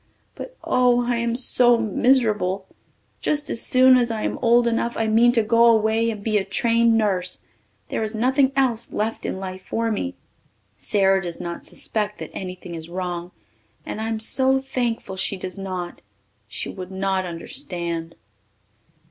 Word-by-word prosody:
But, - - -9
oh, 245 -1 +3
I 240 -1 0
am 235 0 -1
so 245 -1 +4
miserable! 215 -4 +1 0.6
Just 295 0 0
as 230 - 0
soon 255 0 +6
as 240 -1 +1
I 220 -2 -3
am - - -2
old 240 0 +4
enough 235 0 0
I 225 - +1
mean 225 +2 +4
to 230 -2 +3
go 230 +2 +4
away 225 0 +3
and 210 -3 -5
be 215 -1 +2
a - - -2
trained 230 +3 +2
nurse. 185 -4 -1 0.5
There - - -2
is 220 0 -2
nothing 260 +4 +2
else 240 -4 0
left 220 +2 -2
in - - -3
life 190 -1 -7
for 230 0 -1
me. 265 +6 -3 0.6
Sara 195 -2 +2
does 175 -2 -5
not 170 0 -6
suspect 210 -1 -2
that - - -8
anything 180 -2 -7
is 165 0 -7
wrong 175 -1 -4 0.6
and 215 - -5
I 220 - -2
am 225 -1 -2
so 265 +4 +3
thankful 245 -7 -3
she 195 - 0
does 185 +1 -7
not. 185 -2 -5 0.5
She - - -5
would 185 -2 -7
not 190 0 -1
understand. 170 - -5
220 Hz, 165 wpm, -23 LUFS, 190-240 Hz, 0.6 s, soon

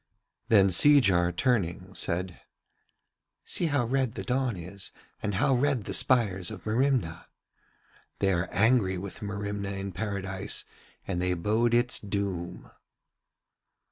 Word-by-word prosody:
Then 100 -3 +5
Seejar 95 -8 +5
turning 95 -3 -1
said: 90 +1 -3 1.0
'See 170 - -1
how 145 -5 +1
red 130 -1 0
the - - -6
dawn 125 -4 -1
is 90 +3 -8 0.3
and 105 -1 -2
how 120 +7 +2
red 130 -2 +1
the - - -5
spires 100 -8 +2
of 110 -4 -9
Merimna. 110 -7 0 0.9
They 95 -1 +1
are 85 0 -1
angry 100 -3 +2
with 95 +2 -8
Merimna 100 -1 -4
in 100 0 -5
Paradise 95 -2 -3 0.4
and 90 -2 -2
they 90 0 0
bode 110 +7 +1
its 120 0 +2
doom.' 100 -4 -4
100 Hz, 125 wpm, -28 LUFS, 95-120 Hz, 1.0 s, Then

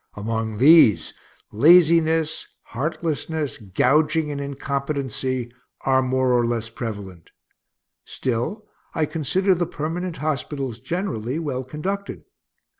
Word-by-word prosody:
Among 110 +1 -3
these, 130 - +6 0.4
laziness, 160 +3 +4 0.2
heartlessness, 155 +1 -3
gouging, 150 - +1
and 140 -1 -4
incompetency 135 -3 -3 0.3
are 130 0 +3
more 130 0 +1
or 120 -1 +3
less 115 -1 -2
prevalent. 100 -8 -7 0.7
Still, 130 - -3 0.3
I 160 - +2
consider 165 +6 +1
the 175 -1 -1
permanent 165 +3 -4
hospitals, 140 -5 -3
generally, 145 - -3
well 140 -6 -3
conducted. 185 +10 -5
140 Hz, 100 wpm, -23 LUFS, 120-160 Hz, 0.7 s, these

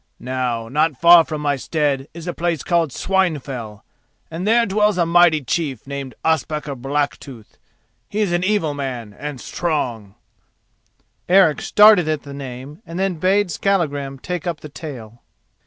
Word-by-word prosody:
Now, 125 -3 -3
not 150 +2 0
far 170 0 +8
from 155 -1 -5
my 145 -1 +1
stead 140 -1 -1
is 165 0 -10
a 175 - -3
place 170 -4 -2
called 170 -3 +1
Swinefell, 140 - -2 0.5
and 170 +5 -4
there 230 +1 +4
dwells 210 -1 +1
a 170 - +2
mighty 170 -3 +4
chief 135 -3 -2
named 135 -3 -6
Ospakar 155 -2 0
Blacktooth; 135 -3 -4 0.5
he 210 - -3
is 200 -4 0
an 175 +1 0
evil 185 -6 +1
man 125 -7 -5
and 145 +2 -7
strong——" 120 - -3 1.1
Eric 180 -5 +5
started 210 -5 +6
at 155 -2 -1
the 140 - -9
name 140 - -8
and 165 -4 -8
then 190 -3 -1
bade 190 +2 +2
Skallagrim 145 -7 -1
take 175 +4 -5
up 170 -3 -3
the 150 - -9
tale. 120 -7 -9
150 Hz, 155 wpm, -20 LUFS, 135-175 Hz, 1.1 s, far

